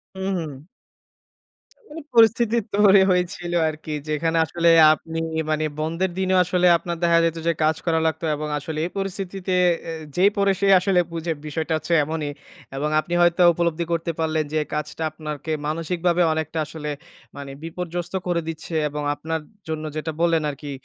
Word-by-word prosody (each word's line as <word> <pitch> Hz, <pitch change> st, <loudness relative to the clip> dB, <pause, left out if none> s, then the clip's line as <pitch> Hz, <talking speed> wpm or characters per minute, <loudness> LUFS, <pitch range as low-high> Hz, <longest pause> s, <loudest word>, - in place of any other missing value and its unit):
হু, 190 Hz, -, -8 dB, 0.2 s
হু। 150 Hz, -5 st, -6 dB, 1.2 s
মানে 315 Hz, +2 st, -8 dB
পরিস্থিতি 230 Hz, 0 st, +4 dB, 0.2 s
তৈরি 200 Hz, -1 st, +6 dB
হয়েছিল 175 Hz, -1 st, -1 dB, 0.2 s
আরকি 155 Hz, 0 st, -6 dB, 0.2 s
যেখানে 160 Hz, +2 st, 0 dB
আসলে 170 Hz, +1 st, 0 dB, 0.3 s
আপনি 165 Hz, +1 st, -6 dB, 0.3 s
মানে 155 Hz, 0 st, 0 dB, 0.2 s
বন্ধের 165 Hz, +4 st, -1 dB
দিনেও 185 Hz, 0 st, +2 dB
আসলে 180 Hz, 0 st, +1 dB
আপনার 170 Hz, 0 st, -4 dB
দেখা 170 Hz, 0 st, +4 dB
যেত 165 Hz, 0 st, 0 dB
যে 170 Hz, -, +4 dB
কাজ 155 Hz, 0 st, +2 dB
করা 165 Hz, -1 st, +2 dB
লাগতো 160 Hz, +1 st, -2 dB
এবং 150 Hz, +1 st, -4 dB
আসলে 155 Hz, +2 st, -6 dB
এই 180 Hz, -, -7 dB
পরিস্থিতিতে 195 Hz, -1 st, -3 dB, 0.4 s
এ -, -, -3 dB, 0.2 s
যেই 195 Hz, +3 st, +5 dB
পরে 200 Hz, -1 st, +3 dB
সেই 195 Hz, 0 st, +4 dB
আসলে 185 Hz, -1 st, +2 dB
বুঝে 165 Hz, 0 st, -2 dB
বিষয়টা 160 Hz, +2 st, -3 dB
হচ্ছে 170 Hz, -, -4 dB
এমনই 155 Hz, -1 st, -3 dB, 0.5 s
এবং 150 Hz, +2 st, -1 dB
আপনি 175 Hz, +2 st, -5 dB
হয়তো 175 Hz, +1 st, +4 dB
উপলব্ধি 170 Hz, 0 st, 0 dB
করতে 165 Hz, 0 st, -1 dB
পারলেন। 160 Hz, -1 st, 0 dB
যে 155 Hz, -, +1 dB
কাজটা 150 Hz, +1 st, -4 dB
আপনাকে 155 Hz, 0 st, -6 dB
মানসিকভাবে 170 Hz, +2 st, 0 dB
অনেকটা 160 Hz, 0 st, -3 dB
আসলে 150 Hz, -1 st, -6 dB, 0.5 s
মানে 140 Hz, -1 st, -7 dB
বিপর্যস্ত 175 Hz, +1 st, -5 dB
করে 175 Hz, -1 st, +1 dB
দিচ্ছে 165 Hz, +1 st, -6 dB
এবং 150 Hz, 0 st, -5 dB
আপনার 160 Hz, +2 st, -4 dB, 0.3 s
জন্য 155 Hz, 0 st, -3 dB
যেটা 160 Hz, +1 st, -3 dB
বললেন 165 Hz, -2 st, +3 dB
আরকি। 145 Hz, 0 st, -8 dB
165 Hz, 160 wpm, -23 LUFS, 155-180 Hz, 1.2 s, তৈরি